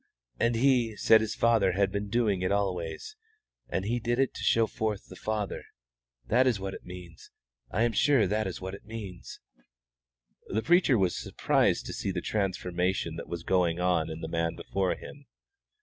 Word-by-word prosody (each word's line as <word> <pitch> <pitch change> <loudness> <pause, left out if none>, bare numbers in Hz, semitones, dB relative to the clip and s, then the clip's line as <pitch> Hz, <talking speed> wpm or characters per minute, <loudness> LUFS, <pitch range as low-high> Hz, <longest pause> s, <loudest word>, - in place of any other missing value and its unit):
And 115 0 +2
He 120 -3 +3
said 110 +1 +5
His 110 - -2
Father 110 -5 +3
had 100 +1 +1
been 100 0 -3
doing 105 -4 +1
it 90 - 0
always, 95 - -2 0.5
and 95 - -2
He 120 +3 0
did 120 +1 -1
it 135 -1 +1
to - - -8
show 115 0 +4
forth 110 -1 -3
the - - -12
Father. 105 -2 -3 0.6
That 125 - +3
is 115 -6 +2
what 95 0 -4
it - - -9
means. 90 -2 -11 0.4
I 110 - +1
am 120 - +2
sure 135 -1 +3
that 105 +2 0
is 90 - -5
what 95 0 -6
it 100 - -9
means." 105 -5 -8 1.1
The 110 +2 -1
preacher 175 -7 +4
was 95 -3 +1
surprised - - +1
to - - -5
see - - -3
the 95 -2 -1
transformation 90 -3 -1
that - - -7
was 85 -1 -5
going 90 -2 +1
on 90 -3 +1
in 80 +1 -6
the - - -4
man 85 0 -1
before 95 -2 -1
him. 140 -1 -12
100 Hz, 185 wpm, -29 LUFS, 90-115 Hz, 1.1 s, said